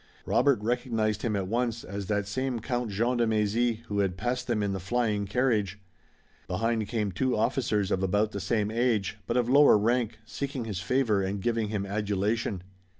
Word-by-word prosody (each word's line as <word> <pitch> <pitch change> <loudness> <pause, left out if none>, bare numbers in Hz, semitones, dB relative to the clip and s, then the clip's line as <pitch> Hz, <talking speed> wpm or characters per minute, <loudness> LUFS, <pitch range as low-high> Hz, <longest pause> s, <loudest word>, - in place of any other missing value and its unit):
Robert 135 -1 +3
recognized 110 -3 0
him 110 -3 -1
at 100 -2 -1
once 115 +2 -1
as 100 0 -6
that 105 -1 0
same 130 +3 -2
Count 120 0 -2
Jean 115 +5 0
de 120 -1 +2
Mézy 110 +2 +1
who 105 -3 -3
had 95 -2 0
passed 125 +2 -2
them 110 -4 0
in 100 -1 -1
the 95 - -3
flying 105 +1 0
carriage. 105 -4 +1 0.7
Behind 110 +3 0
came 105 -3 -1
two 125 +7 0
officers 105 -4 0
of 95 - +1
about 105 +3 +1
the 100 - -4
same 105 +1 0
age, 110 -4 0
but - - 0
of 120 -2 +2
lower 140 -2 +7
rank, 115 +1 +1
seeking 135 +1 -4
his 105 -5 -4
favor 110 0 +1
and 95 +1 -2
giving 115 +1 0
him 105 -2 -2
adulation. 105 0 -1
110 Hz, 185 wpm, -28 LUFS, 100-120 Hz, 0.7 s, lower